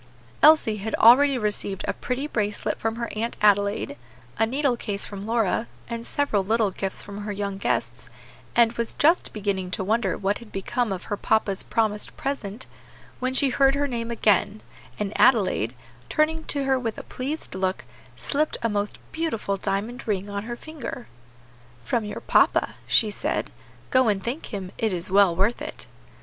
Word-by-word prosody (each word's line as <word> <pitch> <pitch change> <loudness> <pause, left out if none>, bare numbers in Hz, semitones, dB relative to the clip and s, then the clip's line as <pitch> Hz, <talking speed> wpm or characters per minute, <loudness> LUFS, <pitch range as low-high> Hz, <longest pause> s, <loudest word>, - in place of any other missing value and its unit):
Elsie 300 -9 +6
had 215 +2 -2
already 265 +4 +7
received 205 -3 -2
a - - 0
pretty 250 +3 -3
bracelet 210 -7 -2
from 225 0 -1
her 235 0 -3
Aunt 230 +2 -2
Adelaide, 205 0 +2 0.4
a 225 - +4
needle 270 +1 +1
case 205 -3 -2
from 200 -2 -7
Lora, 225 -1 +1 0.2
and 230 0 -5
several 250 -9 +1
little 220 0 +2
gifts 190 +1 -3
from 200 0 -8
her 205 0 -4
young 200 -1 -3
guests, - - -2 0.5
and 235 -1 +5
was 235 -1 -2
just 325 +4 +3
beginning 200 -3 -2
to 185 +1 -2
wonder 210 -2 +1
what 200 +1 0
had 235 -3 -13
become 215 +4 -1
of 185 -2 -4
her 205 - -3
papa's 200 -3 +1
promised 215 -2 -1
present, 245 -5 -4 0.5
when 255 +1 -1
she 275 0 +4
heard 270 +1 +4
her 285 0 +1
name 235 -4 -3
again, 215 -2 +2 0.3
and 210 0 -3
Adelaide, 185 - +3 0.3
turning 315 +1 +1
to 285 -1 -1
her 265 -1 +2
with 230 -3 -3
a - - -6
pleased 280 +5 -5
look, 190 0 -2 0.3
slipped 305 +2 -1
a 230 - +2
most 205 0 -2
beautiful 270 -12 -1
diamond 200 +6 -3
ring 205 -1 -1
on 200 +1 -4
her 240 +1 -4
finger. 290 - -7 0.8
"From 220 - 0
your 210 - -6
papa," - - +3
she 215 -2 +4
said. - - -2 0.4
"Go 260 -2 +4
and 200 -3 +1
thank 260 +7 -4
him: 190 -4 -6
it 220 -3 +1
is 180 +2 0
well 195 -3 +5
worth 205 +7 +1
it." - - -6
220 Hz, 175 wpm, -25 LUFS, 200-250 Hz, 0.8 s, already